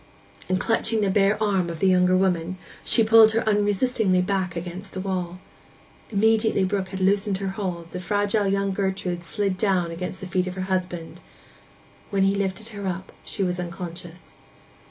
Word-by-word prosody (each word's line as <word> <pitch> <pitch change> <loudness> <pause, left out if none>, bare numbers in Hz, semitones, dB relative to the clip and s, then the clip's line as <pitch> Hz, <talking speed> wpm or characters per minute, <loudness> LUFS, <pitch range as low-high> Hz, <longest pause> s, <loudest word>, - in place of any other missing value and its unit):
And 185 0 +1
clutching 225 0 +1
the 200 -2 +2
bare 200 +1 +3
arm 195 -5 +1
of 165 - -5
the - - +1
younger 185 0 +4
woman, 185 -1 0 0.3
she 230 - +3
pulled 220 0 +7
her 225 0 0
unresistingly 205 -1 +2
back 185 -2 -1
against 180 +3 -6
the 185 - -4
wall. 185 -2 -3 0.7
Immediately 220 -1 +2
Brook 190 0 -1
had 190 - -5
loosened 195 +1 +2
her 195 0 -3
hold 180 -4 -4
the 180 - -5
fragile 205 +2 0
young 195 0 +1
Gertrude 190 -3 -2
slid 195 +1 -1
down 185 -5 +1
against 180 +2 -5
the 190 - -7
feet 185 0 -1
of 185 - -5
her 190 - -4
husband. 185 -3 -3 0.9
When 195 -1 +1
he 195 0 +3
lifted 200 +2 -3
her 200 -3 -6
up 185 +1 -4
she 200 - -3
was 180 -1 -1
unconscious. 175 0 -7
190 Hz, 175 wpm, -24 LUFS, 180-205 Hz, 0.9 s, pulled